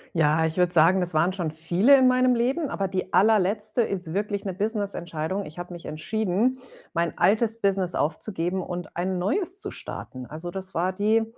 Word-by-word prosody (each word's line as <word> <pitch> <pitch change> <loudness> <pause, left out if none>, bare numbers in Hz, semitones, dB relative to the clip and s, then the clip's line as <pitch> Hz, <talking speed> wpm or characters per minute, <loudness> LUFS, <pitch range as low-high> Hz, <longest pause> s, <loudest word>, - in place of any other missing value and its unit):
Ja, 160 0 +3
ich 160 +2 -3
würde 180 -1 +3
sagen, 175 +3 +5
das 175 -3 -1
waren 175 +4 +3
schon 175 -4 -2
viele 175 - +4
in 260 -1 +5
meinem 255 0 +4
Leben, 265 +6 0
aber 195 - -2
die 185 0 -4
Allerletzte 210 +2 +3
ist 185 -7 -2
wirklich 205 +1 -2
'ne 190 - -2
Businessentscheidung. 195 -3 -2
Ich 155 - -13
habe 175 0 -7
mich 170 -1 -10
entschieden, 220 +9 -1 0.3
mein 170 -1 -1
altes 225 +2 +2
Business 195 -3 +1
aufzugeben 175 +3 -1
und 175 0 -6
ein 185 +1 -1
neues 365 - -1
zu 400 0 -4
starten. 130 -1 -8
Also 165 +3 -7
das 190 0 -7
war 180 +3 0
die, 215 +3 +2
190 Hz, 185 wpm, -25 LUFS, 175-220 Hz, 0.3 s, sagen